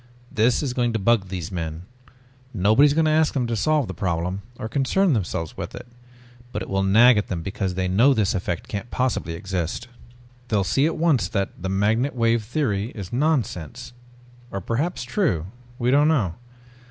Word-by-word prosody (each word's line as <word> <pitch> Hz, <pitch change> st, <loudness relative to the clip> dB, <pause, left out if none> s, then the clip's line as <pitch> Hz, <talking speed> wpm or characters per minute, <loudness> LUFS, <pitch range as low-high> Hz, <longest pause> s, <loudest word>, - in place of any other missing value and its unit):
This 120 Hz, +2 st, +2 dB
is 130 Hz, -4 st, -2 dB
going 120 Hz, -2 st, 0 dB
to -, -, +1 dB
bug 105 Hz, -1 st, +2 dB
these 90 Hz, -3 st, -5 dB
men. 80 Hz, -2 st, -4 dB, 0.7 s
Nobody 110 Hz, +9 st, +5 dB
is 145 Hz, -, +1 dB
going 160 Hz, 0 st, +3 dB
to 155 Hz, -, +3 dB
ask 155 Hz, -1 st, +2 dB
them 130 Hz, -3 st, +1 dB
to 115 Hz, -1 st, -2 dB
solve 150 Hz, +3 st, +1 dB
the -, -, -5 dB
problem 90 Hz, 0 st, -2 dB, 0.2 s
or 110 Hz, -, -4 dB
concern 145 Hz, -, +2 dB
themselves 85 Hz, -, -2 dB
with -, -, -6 dB
it. -, -, -9 dB, 0.7 s
But 105 Hz, -, -3 dB
it -, -, -9 dB
will 95 Hz, 0 st, +1 dB
nag 110 Hz, +4 st, +6 dB
at 105 Hz, -, -3 dB
them 85 Hz, -3 st, -4 dB
because 95 Hz, 0 st, -3 dB
they 95 Hz, 0 st, -1 dB
know 120 Hz, +9 st, +4 dB
this 105 Hz, 0 st, +1 dB
effect 90 Hz, -3 st, -3 dB
can't 100 Hz, +3 st, -5 dB
possibly 125 Hz, -9 st, -1 dB
exist. 95 Hz, +4 st, -3 dB, 0.6 s
They'll 105 Hz, -4 st, +1 dB
see 135 Hz, -, +2 dB
at 165 Hz, -, -2 dB
once 155 Hz, -8 st, +2 dB
that 100 Hz, 0 st, -1 dB
the 95 Hz, -, -3 dB
magnetic 110 Hz, +8 st, +1 dB
wave 115 Hz, -1 st, +2 dB
theory 110 Hz, -4 st, -1 dB
is 100 Hz, -3 st, -7 dB
nonsense. 125 Hz, -, -1 dB, 0.6 s
Or 100 Hz, -, -4 dB
perhaps 125 Hz, -, -2 dB
true? 120 Hz, -, 0 dB, 0.3 s
We 125 Hz, 0 st, +1 dB
don't 145 Hz, +2 st, +5 dB
know. 120 Hz, -, +2 dB
110 Hz, 190 wpm, -23 LUFS, 95-130 Hz, 0.7 s, nag